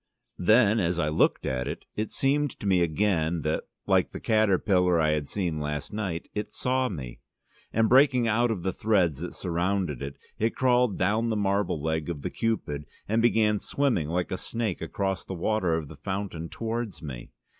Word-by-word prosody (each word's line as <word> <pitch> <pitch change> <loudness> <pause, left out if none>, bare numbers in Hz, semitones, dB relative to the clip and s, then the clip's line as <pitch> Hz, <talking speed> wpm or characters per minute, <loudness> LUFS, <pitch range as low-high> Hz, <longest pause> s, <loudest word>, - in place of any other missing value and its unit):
Then, 110 +3 +5
as 90 -2 0
I 75 -3 +1
looked 75 - +2
at 65 -1 -1
it, - - -5
it 110 0 -2
seemed 140 0 0
to - - -7
me 95 -3 +3
again 85 -1 +1
that, 75 +1 -1 0.2
like - - +3
the - - -7
caterpillar 95 -5 +3
I 80 -1 +3
had 75 -2 -1
seen 85 -6 -2
last 75 +1 -4
night, 95 -6 -3
it 105 0 -2
saw 130 0 0
me, 65 -10 -7 0.5
and 110 0 +3
breaking 130 -1 +5
out 120 +2 +2
of 100 -6 -2
the 95 - -1
threads 90 -10 +1
that 90 +2 -6
surrounded 90 -4 -1
it, 70 0 -6 0.2
it 110 +2 +1
crawled 125 -4 +3
down 110 +3 +1
the 110 - 0
marble 100 -4 0
leg 80 +1 -2
of 75 -5 -5
the - - -3
Cupid 75 -11 -2 0.2
and 110 +2 +2
began 110 -3 +3
swimming 125 - 0
like 90 +1 -1
a 90 - -2
snake 115 -5 -3
across 95 +2 -2
the 95 - -6
water 90 -1 +1
of 80 -3 -3
the 80 - -12
fountain 95 -1 -4
towards 115 -4 -4
me. 65 -5 -7
95 Hz, 190 wpm, -27 LUFS, 80-110 Hz, 0.5 s, Then